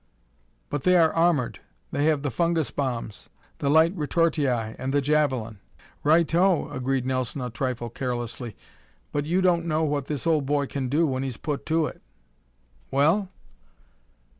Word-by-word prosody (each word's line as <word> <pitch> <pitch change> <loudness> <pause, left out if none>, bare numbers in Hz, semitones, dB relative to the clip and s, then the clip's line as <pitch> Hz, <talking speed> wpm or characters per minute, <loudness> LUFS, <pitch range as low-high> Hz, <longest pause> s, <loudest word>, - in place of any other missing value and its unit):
"But 145 - -1
they 180 0 +5
are 160 -2 +4
armored! 165 -7 +1 0.3
They 145 - 0
have 155 -3 +2
the 145 - -1
fungus 165 +3 0
bombs, 120 -6 -4 0.3
the 140 - 0
light 160 +5 +5
retortii 160 -2 +1 0.3
and 130 +1 -2
the 145 - +3
javelin!" 135 -7 0 0.4
"Righto!" 170 +3 +3
agreed 130 0 -1
Nelson 130 0 -2
a 125 -1 -4
trifle 125 0 -3
carelessly, 120 -2 -4 0.6
"but 145 0 -2
you 180 +4 +2
don't 170 -2 +2
know 155 0 +1
what 145 -3 -1
this 150 0 -4
old 155 -5 +2
boy 145 0 +1
can 135 -2 -3
do 155 +5 +3
when 130 -3 -1
he's 130 -4 -4
put 145 -2 -4
to 160 0 +2
it. - - -7 0.9
Well?" 160 +9 +2
145 Hz, 155 wpm, -25 LUFS, 130-165 Hz, 0.9 s, they